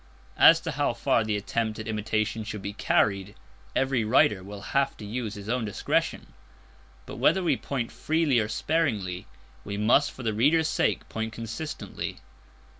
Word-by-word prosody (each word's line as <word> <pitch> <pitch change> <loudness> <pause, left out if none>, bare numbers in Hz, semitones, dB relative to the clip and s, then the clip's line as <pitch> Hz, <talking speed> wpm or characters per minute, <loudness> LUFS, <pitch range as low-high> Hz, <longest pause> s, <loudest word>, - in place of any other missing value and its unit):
As - - +8
to - - -3
how - - 0
far 115 - +2
the 105 -1 -1
attempt 110 +2 -2
at 110 - -6
imitation 110 0 -1
should 105 -2 -6
be 100 +1 -4
carried, 100 -1 +1 0.4
every 135 -3 +1
writer 105 -3 +3
will 100 +1 -8
have 140 0 +1
to 105 - -8
use 110 0 -4
his 100 0 -9
own 120 +1 0
discretion; 105 -2 -1 0.7
but, - - -8
whether 190 - +3
we 175 - +3
point 125 -4 -4
freely 155 -5 +1
or 105 - 0
sparingly, 110 - -1 0.4
we 100 0 -5
must 120 +7 +4
for 130 - -10
the 110 -2 0
reader's 155 +9 +3
sake 155 - 0
point 110 0 -4
consistently. 115 +7 -5
110 Hz, 165 wpm, -27 LUFS, 105-130 Hz, 0.7 s, As